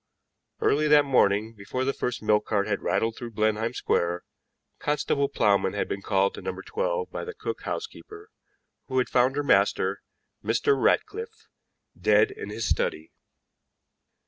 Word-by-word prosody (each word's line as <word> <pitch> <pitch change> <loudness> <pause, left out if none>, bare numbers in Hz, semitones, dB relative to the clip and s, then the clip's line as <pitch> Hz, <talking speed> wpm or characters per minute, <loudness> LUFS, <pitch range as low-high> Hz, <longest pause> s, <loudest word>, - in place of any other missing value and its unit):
Early 150 +2 +2
that 150 -1 +6
morning, 110 -4 +2
before 115 +5 -4
the 135 - 0
first 125 -3 -3
milk 105 0 +2
cart 100 -2 +1
had 100 -2 -2
rattled 115 0 0
through 120 -2 -8
Blenheim 110 +2 0
Square, 85 +1 0 0.6
Constable 145 -1 0
Plowman 100 -1 +2
had - - -1
been 100 - -4
called 100 -1 +1
to - - -8
No. - - -5
12 480 0 -2
by - - -5
the 455 -1 -7
cook - - -5
housekeeper, 430 -1 -7 0.6
who 130 - -2
had 130 - +2
found 130 +1 +3
her 145 - 0
master, 140 - +2 0.4
Mr. 430 -1 +2
Ratcliffe, 445 +2 -1 0.5
dead 425 - +3
in 430 +2 -8
his - - -3
study. 485 0 -1
130 Hz, 150 wpm, -26 LUFS, -, 0.6 s, that